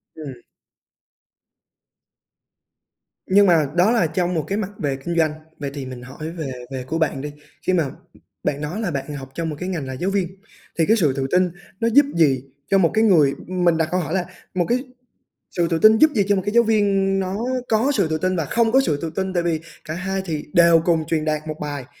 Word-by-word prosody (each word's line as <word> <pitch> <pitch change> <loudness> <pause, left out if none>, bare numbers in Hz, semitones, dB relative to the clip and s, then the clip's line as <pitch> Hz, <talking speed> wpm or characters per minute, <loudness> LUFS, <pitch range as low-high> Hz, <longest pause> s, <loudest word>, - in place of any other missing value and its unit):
Ừm. 140 -6 -9 2.9
Nhưng 200 +2 +5
mà 165 -4 +4
đó 180 +5 +4
là 220 -9 +3
trong 175 +2 -1
một 160 -3 0
cái 200 - -1
mặt 205 -2 -3
về 140 -3 -1
kinh 170 - -2
doanh, 160 -2 +3 0.3
vậy 140 -1 -4
thì 140 -2 -6
mình 130 -1 -8
hỏi 135 +5 -7
về 160 -6 -5 0.2
về 130 -1 -4
của 160 +5 -3
bạn 155 -4 0
đi. 150 0 -5 0.4
Khi 185 - +3
mà 165 -6 +1 0.5
bạn 145 +1 -1
nói 175 +9 -4
là 195 - -1
bạn 140 0 -4
học 135 -1 -8
trong 165 -1 -2
một 150 - -4
cái 180 +1 -4
ngành 155 -8 -3
là 130 - -5
giáo 180 +9 -2
viên 195 -3 0 0.5
thì 160 - +4
cái 225 +2 +3
sự 150 -9 +2
tự 135 -1 -1
tin 180 0 +3 0.3
nó 230 - +1
giúp 285 +1 +7
gì 135 -6 +3 0.3
cho 195 - +5
một 175 -4 +3
cái 220 - +3
người 160 -10 +5
ừm, 185 -1 -2
mình 170 -2 +4
đặt 160 -1 +1
câu 185 - +1
hỏi 160 -1 -3
là 185 -2 0 0.3
một 180 -2 +1
cái 245 +1 +2 0.7
sự 170 -2 0
tự 165 -1 0
tin 220 0 +7
giúp 310 +3 +5
gì 205 - +4
cho 205 - +3
một 190 - 0
cái 205 - -1
giáo 235 0 +6
viên 195 -3 +2
nó 190 0 -2 0.3
có 230 +6 +2
sự 195 -6 +2
tự 160 - 0
tin 185 +3 0
và 165 -4 -1
không 230 - +1
có 265 +1 +5
sự 150 - 0
tự 165 - -3
tin 190 -1 -2
tại 175 -1 +1
vì 165 -2 0 0.3
cả 155 - -4
hai 190 +2 -2
thì 155 -4 -4
đều 170 -1 +6
cùng 165 -3 +2
truyền 155 -2 -1
đạt 155 0 -2
một 155 0 -5
bài, 145 -4 -5
170 Hz, 235 wpm, -21 LUFS, 150-195 Hz, 2.9 s, giúp